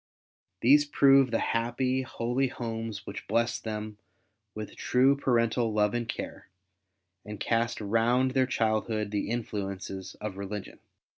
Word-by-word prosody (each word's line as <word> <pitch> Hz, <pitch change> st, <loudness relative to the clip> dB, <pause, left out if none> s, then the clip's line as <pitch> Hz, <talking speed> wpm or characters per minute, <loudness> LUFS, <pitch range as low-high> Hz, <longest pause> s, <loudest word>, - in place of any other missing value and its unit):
These 145 Hz, +5 st, +6 dB
prove 135 Hz, -2 st, +5 dB
the 115 Hz, -, +1 dB
happy, 125 Hz, +3 st, 0 dB
holy 125 Hz, +1 st, -1 dB
homes 115 Hz, -4 st, -5 dB
which -, -, -7 dB
blessed 115 Hz, +1 st, 0 dB
them 105 Hz, -1 st, -5 dB, 0.6 s
with 105 Hz, -1 st, -6 dB
true 130 Hz, +3 st, +3 dB
parental 115 Hz, -3 st, +1 dB
love 105 Hz, -1 st, +2 dB
and 120 Hz, -1 st, -2 dB
care, -, -, -6 dB, 0.8 s
and 105 Hz, -1 st, -8 dB
cast 115 Hz, +2 st, 0 dB
round 115 Hz, +5 st, +2 dB
their 130 Hz, -1 st, +2 dB
childhood 110 Hz, -3 st, 0 dB
the 105 Hz, 0 st, -2 dB
influences 100 Hz, -4 st, -4 dB
of 105 Hz, -3 st, -6 dB
religion. 100 Hz, 0 st, -6 dB
115 Hz, 130 wpm, -29 LUFS, 105-125 Hz, 0.8 s, These